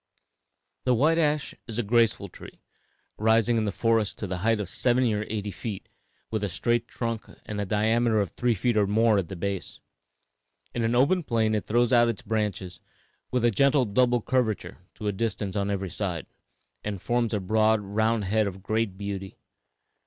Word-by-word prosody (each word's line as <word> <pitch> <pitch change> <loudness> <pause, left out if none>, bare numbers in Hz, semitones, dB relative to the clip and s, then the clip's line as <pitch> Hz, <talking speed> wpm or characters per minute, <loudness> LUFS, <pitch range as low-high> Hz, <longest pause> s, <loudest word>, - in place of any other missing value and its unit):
The 125 -1 +3
white 155 +7 +3
ash 150 -2 +1
is 115 -2 -5
a 120 - +1
graceful 110 -2 +2
tree, 90 - -13 0.6
rising 115 +2 +3
in 110 -1 +1
the 105 - 0
forest 115 0 +1
to - - -4
the 90 -2 -4
height 110 +3 +2
of 105 - -3
seventy 120 +3 +2
or 105 0 -2
eighty 105 -1 -3
feet, 100 +1 -6 0.4
with 110 -2 -1
a 100 - 0
straight 120 +6 0
trunk 115 -2 -4 0.2
and 105 -1 -4
a 100 - -3
diameter 110 +2 +2
of 100 -3 -1
three 120 -2 0
feet 120 +4 0
or 105 -2 +3
more 110 0 +3
at 90 - -3
the 95 - -7
base. 100 +1 -4 1.0
On 120 - 0
an 115 +1 +1
open 140 +9 +3
plain 115 -6 +1
it 105 - -1
throws 120 +2 +2
out 120 -1 +5
its 115 +2 -4
branches, 105 -5 -2 0.5
with 125 -2 +1
a 120 - +4
gentle 140 +4 +3
double 120 +2 +2
curvature, 125 -4 -1 0.2
to 105 - -8
a 105 - +1
distance 100 -2 -3
on 100 -1 0
every 95 -2 -2
side, 90 -7 -3 0.6
and 105 -2 -4
forms 120 +3 0
a 105 - 0
broad, 110 +3 +2
round 110 +2 0
head 110 +2 +1
of 95 -1 -7
great 110 -2 -1
beauty. 100 -1 -5
110 Hz, 190 wpm, -26 LUFS, 100-120 Hz, 1.0 s, out